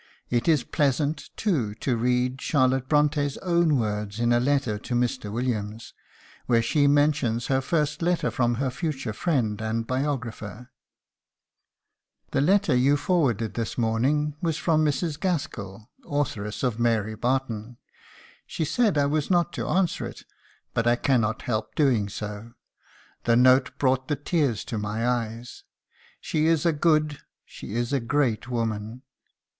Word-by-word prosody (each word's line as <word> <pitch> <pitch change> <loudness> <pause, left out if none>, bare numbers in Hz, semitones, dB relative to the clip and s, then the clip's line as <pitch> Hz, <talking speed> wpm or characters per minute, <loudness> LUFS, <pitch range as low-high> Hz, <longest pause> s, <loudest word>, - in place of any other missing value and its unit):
'" - - -43
It - - -10
is 155 -6 +4
pleasant, 145 +2 0
too, 130 - 0
to 125 +2 -1
read 125 +2 0
Charlotte 130 -2 +1
Bront├½'s 145 -2 +2
own 170 -4 +3
words 105 -2 -2
in 120 0 +2
a 120 - +4
letter 125 -5 0
to 120 - -4
Mr. 120 -3 -1
Williams, 110 -2 -3 0.5
where 115 -2 +3
she 145 +5 +2
mentions 140 -5 +2
her 130 - +2
first 150 +1 -1
letter 175 +1 +1
from 120 -1 +1
her 130 +1 -1
future 140 -6 -3
friend 110 - 0
and 110 +1 -2
biographer: 125 -4 -4 1.6
"The - - +1
letter 195 +1 +3
you 135 +4 +4
forwarded 135 - 0
this 115 -2 -3
morning 135 +6 +1
was 165 -3 0
from 155 -2 +2
Mrs. 150 +1 -1
Gaskell, 110 - -3
authoress 110 -8 -3
of 120 -3 0
'Mary 110 -2 +1
Barton.' 120 -1 -2 0.7
She 160 - -2
said 215 +1 +1
I 145 - +3
was 150 0 0
not 175 -2 +2
to - - -3
answer 185 -2 0
it, - - -11 0.5
but 115 - 0
I 120 - +5
cannot 120 -4 +1
help 110 -2 -3
doing 120 -9 +2
so. 105 +3 -7 0.7
The 115 - +4
note 130 +1 +4
brought 130 -1 +1
the 145 - 0
tears 145 - -1
to 110 - -3
my 105 +3 -2
eyes. 120 -1 -3 0.6
She 155 0 0
is 165 0 +2
a 170 - +3
good, 155 -1 +2 0.3
she 105 - -9
is 120 +3 -1
a 140 - +2
great 120 -2 0
woman. 115 0 -3
130 Hz, 150 wpm, -25 LUFS, 115-150 Hz, 1.6 s, I